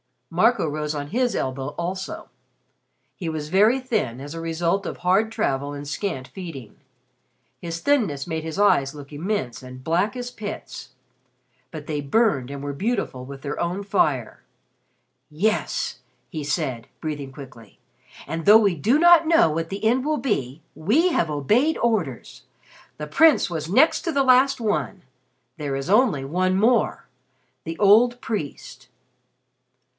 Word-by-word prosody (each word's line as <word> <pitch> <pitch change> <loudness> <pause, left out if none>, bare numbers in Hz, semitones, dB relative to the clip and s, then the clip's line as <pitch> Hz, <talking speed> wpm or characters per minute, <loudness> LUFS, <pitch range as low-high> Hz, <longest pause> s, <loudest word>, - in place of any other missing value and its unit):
Marco 235 -5 +3
rose 150 0 -3
on 145 -1 -4
his 245 - 0
elbow 135 +2 -3
also. 185 +2 -5 0.9
He 175 - -5
was 155 -2 -4
very 210 +8 +4
thin 215 - -2
as 145 +2 -7
a 165 - -6
result 170 +4 -1
of - - -5
hard 190 +5 +2
travel 145 - -1
and 145 0 -7
scant 140 -4 -4
feeding. 160 - -9 0.8
His 165 -1 -5
thinness 210 - +1
made 160 -2 -4
his 160 +2 -5
eyes 140 -9 +3
look 145 -1 -11
immense 145 - -3
and 130 0 -11
black 180 - 0
as 245 0 -5
pits. 210 -3 -8 0.8
But 155 -3 -8
they 150 -2 -3
burned 140 - +1
and 140 0 -7
were 145 0 -4
beautiful 195 - -2
with 135 0 -9
their 140 - -5
own 180 +4 -2
fire. 150 - 0 0.9
"Yes," 210 +9 -1 0.3
he 155 -5 -5
said, 135 -6 -2
breathing 145 -3 -5
quickly. 130 -5 -13 0.5
"And 165 +2 -5
though 210 +2 +9
we 205 -4 +3
do 220 - +2
not 340 0 +6
know 325 - +4
what 165 +1 -3
the 195 +2 -6
end 245 +4 +2
will 305 0 +1
be, 165 - -2
we 280 - +2
have 170 - 0
obeyed 215 - +1
orders. 195 - -2 0.5
The 150 - -5
Prince 310 - +4
was 160 -2 -4
next 265 - +4
to 335 - -1
the 275 - +3
last 260 +1 +4
one. 205 -3 -2 0.5
There 145 -2 -3
is 135 +5 -4
only 205 - +3
one 185 +5 0
more. 230 +3 +2 0.6
The 165 0 -5
old 230 +4 +5
priest." 195 -11 -6
170 Hz, 150 wpm, -23 LUFS, 145-220 Hz, 0.9 s, though